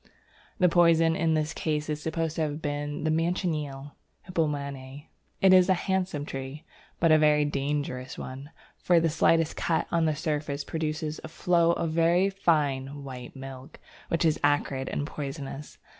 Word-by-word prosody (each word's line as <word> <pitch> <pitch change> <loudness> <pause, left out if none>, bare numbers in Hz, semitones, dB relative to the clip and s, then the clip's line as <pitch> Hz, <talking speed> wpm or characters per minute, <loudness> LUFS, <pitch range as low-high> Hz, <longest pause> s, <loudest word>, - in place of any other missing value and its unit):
The 180 -4 +4
poison 165 -1 +4
in 160 -1 +1
this 155 +1 -1
case 150 -1 -2
is 150 -1 -3
supposed 160 0 -2
to - - 0
have 150 -1 -2
been 145 0 -3
the 155 - +1
Manchineel 155 -4 -1 0.4
(Hippomane). 145 -4 -3 0.4
It 190 -1 +6
is 185 -1 +6
a 190 - +5
handsome 185 -5 -1
tree, 135 +3 -7 0.3
but 165 -1 +4
a 155 - +6
very 150 -1 +4
dangerous 140 -2 -3
one, 135 +3 -7 0.3
for 175 -1 +4
the 165 0 +2
slightest 165 0 +2
cut 165 - 0
on 165 -1 +2
the 155 -1 +1
surface 150 -2 -2
produces 155 0 -3
a - - -5
flow 170 +1 +2
of 170 - -1
a - - -4
very 170 +4 +3
fine 145 -7 0
white 125 -2 -8
milk 135 +2 -10 0.3
which 165 0 0
is 155 -2 +2
acrid 145 -2 +1
and 145 - -2
poisonous. 140 -1 -6
155 Hz, 165 wpm, -27 LUFS, 145-165 Hz, 0.4 s, It